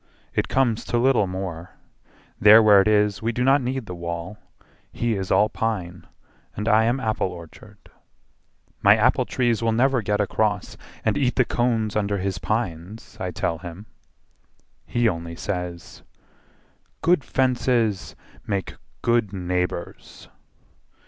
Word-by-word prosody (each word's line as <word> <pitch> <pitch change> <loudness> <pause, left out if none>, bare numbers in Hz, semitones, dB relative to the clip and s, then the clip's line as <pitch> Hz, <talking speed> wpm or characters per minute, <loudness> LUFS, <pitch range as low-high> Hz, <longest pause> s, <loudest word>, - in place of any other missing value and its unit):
It - - 0
comes 120 -4 +1
to 120 - -1
little 120 -4 +3
more: 90 -2 -6 0.6
There 110 +2 +8
where 105 -2 +7
it 95 - -1
is 105 -1 +2
we 115 +1 0
do 125 +2 -2
not 135 +2 +4
need 130 0 -3
the 90 - -7
wall: 85 +3 -6 0.5
He 120 -1 -1
is 95 -3 -3
all 105 - +4
pine 95 -7 -4 0.5
and 105 +2 -4
I 110 0 +4
am 120 +3 +1
apple 110 -5 -1
orchard. 85 -3 -12 1.0
My 100 +1 +7
apple 125 +3 +3
trees 120 -3 0
will 115 0 +1
never 130 +2 +2
get 105 0 -1
across 105 0 -1 0.3
And - - +1
eat 130 -3 +1
the 130 - +3
cones 115 -3 0
under 100 -1 0
his 95 0 -3
pines, 105 -2 -4
I 95 - -3
tell 85 -2 -2
him. 90 +3 -9 1.0
He 120 -1 +1
only 85 -3 -3
says, 90 -2 -5 1.0
"Good 170 -3 +3
fences 120 -6 0 0.3
make 100 -3 -3 0.3
good 120 -4 +1
neighbours." 90 -2 -4
105 Hz, 140 wpm, -23 LUFS, 90-120 Hz, 1.0 s, There